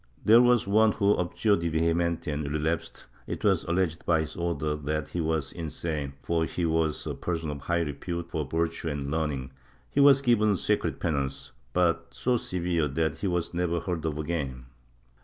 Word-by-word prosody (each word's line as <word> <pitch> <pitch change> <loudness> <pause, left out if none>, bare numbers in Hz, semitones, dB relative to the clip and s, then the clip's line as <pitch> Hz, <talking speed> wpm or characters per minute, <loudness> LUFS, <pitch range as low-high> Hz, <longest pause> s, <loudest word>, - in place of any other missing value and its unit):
There 115 +3 +8
was 125 -2 +4
one 110 +1 +4
who 100 -1 +3
abjured 100 +3 +1
de 85 0 -1
vehementi 85 0 0
and 75 -1 -3
relapsed. 80 +2 -2 0.2
It - - -5
was - - +3
alleged 85 -1 0
by 80 -2 +3
his 80 - -6
Order 75 -3 -1
that 75 +1 -3
he 90 - -2
was 80 -3 -1
insane, 75 -3 -4
for 85 -1 +1
he 85 +1 -2
was 80 -1 0
a - - -2
person 80 -3 -3
of 70 -1 -6
high 85 +3 0
repute 85 +3 -4
for 80 - -1
virtue 80 +3 -2
and 70 -1 -3
learning; 75 -5 -2 0.4
he - - 0
was 140 -1 +7
given 110 -5 +3
secret - - 0
penance, 70 -4 -2 0.2
but 85 +1 +1
so 125 0 +1
severe 85 -6 -1
that 80 +2 -1
he 100 - -1
was 90 -2 -1
never 85 -1 0
heard 85 -2 -3
of 75 -2 -2
again. 70 -6 -3
85 Hz, 180 wpm, -28 LUFS, 75-90 Hz, 0.4 s, There